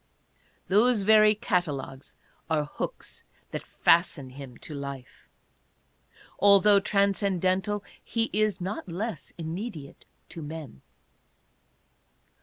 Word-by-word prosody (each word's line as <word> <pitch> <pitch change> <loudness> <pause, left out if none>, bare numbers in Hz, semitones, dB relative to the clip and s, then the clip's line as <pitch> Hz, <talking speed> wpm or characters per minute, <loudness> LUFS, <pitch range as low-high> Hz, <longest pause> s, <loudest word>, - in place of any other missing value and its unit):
Those 215 +2 +4
very 215 +1 +6
cat 190 -5 +1
alogues 135 -2 -7 0.3
are 155 -2 +1
hooks 145 - -6 0.3
that - - -4
fasten 165 -6 +2
him 130 -2 -10
to - - -9
life. 140 -3 -8 1.1
Altogether 200 0 +6
trans 200 0 +2
cendental, 190 +1 0 0.2
he 230 -1 -2
is 215 -1 +1
not 190 +1 -5
less 180 -1 -4
immediate 165 -2 -7 0.2
to 165 -1 -8
men. 150 - -8
185 Hz, 100 wpm, -27 LUFS, 150-205 Hz, 1.1 s, very